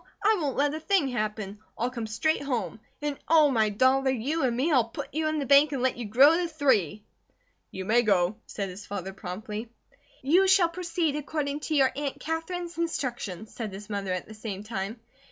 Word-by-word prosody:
I 425 -1 +4
won't 280 -4 -2
let 290 +1 +2
a 310 - -3
thing 320 -4 +2
happen. 215 -4 -3 0.2
I'll 245 +2 -1
come 235 -3 -4
straight 220 +9 0
home. 230 - -3 0.2
And 290 -2 -2
oh, 310 -3 +5
my 220 -4 +3
dollar, 260 +5 +3
you 265 +6 -1
and 240 -2 +1
me; 290 +7 +1
I'll 245 -6 +3
put 285 +3 -7
you 310 +1 0
in 310 0 0
the 285 - -1
bank 280 +2 +6
and 260 -2 -2
let 260 - +2
you 240 - -5
grow 265 +9 +6
to 350 -1 0
three!" 245 - +1 0.7
"You 190 0 -6
may 230 +4 +4
go," 195 -2 +2
said 200 -2 -4
his 190 +3 -10
father, 195 -1 -5
promptly. 210 +4 -6 0.5
"You 355 +8 +4
shall 380 -3 +5
proceed 335 -3 -1
according 295 -1 -3
to 310 +1 -2
your 270 -2 +4
Aunt 280 -1 -3
Katherine's 335 +2 -4
instructions," 240 - -3
said 220 -4 -5
his 205 +2 -9
mother, 200 -2 -2
at 185 -1 -3
the 220 - -10
same 210 -2 -6
time. 215 +1 -4
260 Hz, 205 wpm, -27 LUFS, 215-305 Hz, 0.7 s, bank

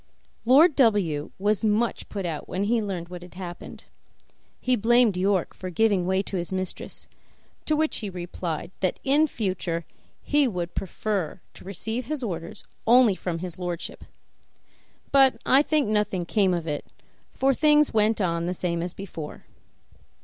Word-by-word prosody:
Lord 285 +6 +6
W 195 - +2
was 205 +1 0
much 220 +2 0
put 200 -3 -4
out 160 -3 -4
when 190 - -1
he 225 +2 +2
learned 185 -5 -4
what 180 -1 -8
had 180 0 -13
happened; 180 -2 -8 0.8
he 255 0 +2
blamed 235 -1 +4
York 190 0 +1
for 185 - -7
giving 200 -1 +2
way 190 +1 +1
to 195 - -4
his 175 +1 -3
mistress, 185 -1 -3 0.6
to 310 - +2
which 310 +1 +1
he 210 - -4
replied 175 -2 -5
that 185 - 0
in 290 +3 +4
future 185 - -2 0.4
he 290 -2 +3
would 180 -6 -3
much - - -38
prefer 195 -2 -3
to - - -13
receive 220 +6 -4
his 300 -3 -3
orders 170 -6 -5 0.2
only 240 -2 +6
from 180 -2 -4
his 180 0 -8
lordship; 175 -2 -5 1.1
but 270 -4 +5
I 270 - +6
think 300 -3 +1
nothing 210 -4 0
came 190 -1 +2
of 170 -2 -3
it, 150 -2 -3 0.4
for 270 +1 +2
things 300 0 +4
went 220 0 +3
on 170 -3 0
the 180 - -2
same 170 -1 -2
as 175 +1 -5
before. 165 -6 -8
195 Hz, 165 wpm, -25 LUFS, 175-235 Hz, 1.1 s, Lord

